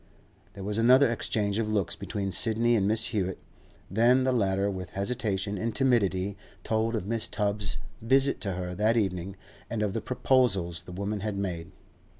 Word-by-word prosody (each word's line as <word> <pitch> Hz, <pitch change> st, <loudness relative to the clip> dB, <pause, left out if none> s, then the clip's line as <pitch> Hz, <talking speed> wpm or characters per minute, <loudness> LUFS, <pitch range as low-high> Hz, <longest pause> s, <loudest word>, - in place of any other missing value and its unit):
There 100 Hz, -, -7 dB
was 105 Hz, +2 st, -1 dB
another 125 Hz, +2 st, +6 dB
exchange 105 Hz, -2 st, 0 dB
of 110 Hz, -1 st, -1 dB
looks 105 Hz, -4 st, 0 dB
between 100 Hz, -1 st, -4 dB
Sidney 115 Hz, +4 st, +2 dB
and 100 Hz, -2 st, +2 dB
Mrs. 110 Hz, +1 st, +2 dB
Hewett; 95 Hz, -5 st, -1 dB, 0.5 s
then 120 Hz, +6 st, +4 dB
the 130 Hz, -, +2 dB
latter 100 Hz, -4 st, +1 dB
with 95 Hz, -3 st, -4 dB
hesitation 100 Hz, -2 st, -2 dB
and 115 Hz, +2 st, -2 dB
timidity 100 Hz, -7 st, +1 dB, 0.3 s
told 110 Hz, +1 st, 0 dB
of 110 Hz, -, -2 dB
Mrs. 115 Hz, +1 st, 0 dB
Tubbs's 105 Hz, -2 st, -1 dB, 0.2 s
visit 135 Hz, +4 st, +2 dB
to 100 Hz, -3 st, -1 dB
her 90 Hz, 0 st, -4 dB
that 110 Hz, +5 st, +2 dB
evening, 95 Hz, -3 st, -1 dB, 0.3 s
and 110 Hz, -2 st, -1 dB
of 100 Hz, -2 st, -1 dB
the 115 Hz, -, -2 dB
proposals 110 Hz, -10 st, +1 dB
the -, -, -12 dB
woman 100 Hz, +3 st, -3 dB
had 105 Hz, 0 st, -3 dB
made. 90 Hz, -4 st, -3 dB
105 Hz, 170 wpm, -28 LUFS, 95-115 Hz, 0.5 s, another